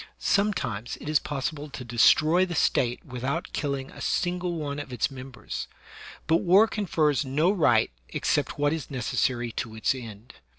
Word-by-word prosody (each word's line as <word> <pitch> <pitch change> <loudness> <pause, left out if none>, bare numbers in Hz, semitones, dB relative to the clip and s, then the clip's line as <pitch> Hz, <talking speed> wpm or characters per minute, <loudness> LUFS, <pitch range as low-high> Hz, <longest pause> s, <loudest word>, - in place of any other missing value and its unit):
Sometimes 180 - 0
it - - -9
is 155 -1 +3
possi 140 0 -3
ble 150 0 -8
to 135 - -7
destroy 155 +9 +4
the 180 -2 -3
State 125 -4 +1
without 125 +1 -4
killing 140 -2 -3
a - - -11
single 180 0 -1
one 145 -2 -4
of 145 -2 -7
its 125 +2 -1
members; 130 -1 -7 0.6
but 160 +1 +4
war 190 +5 +5
confers 155 - +1
no 150 +7 +2
right 185 - +3 0.2
except - - -1
what 145 +1 +2
is 160 -3 -4
neces 130 -5 -4
sary 120 -2 +1
to 110 0 -5
its 110 - +1
end. 115 -2 -10
145 Hz, 170 wpm, -26 LUFS, 125-165 Hz, 0.6 s, war